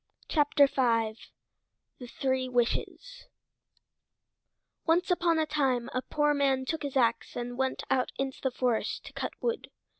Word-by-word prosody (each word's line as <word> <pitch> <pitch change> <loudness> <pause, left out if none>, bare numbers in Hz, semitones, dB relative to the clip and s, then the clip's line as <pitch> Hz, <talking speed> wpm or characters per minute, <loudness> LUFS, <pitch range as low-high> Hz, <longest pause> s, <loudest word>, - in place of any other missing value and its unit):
THE 260 -7 +3 0.9
THREE 260 +1 -1
WISHES 250 - -2 1.6
Once 345 +3 +3
upon 340 -2 +2
a 315 - +2
time 270 -5 0
a 255 - 0
poor 295 +2 +1
man 270 -2 +1
took 320 +3 -2
his 280 -2 -2
ax 235 -2 +1
and 245 0 -4
went 265 +1 -1
out 255 -1 +1
into 270 -1 -3
the 265 - +1
forest 250 -2 -1
to - - -10
cut - - -4
wood. 470 -1 -2
265 Hz, 130 wpm, -29 LUFS, 250-300 Hz, 1.6 s, THE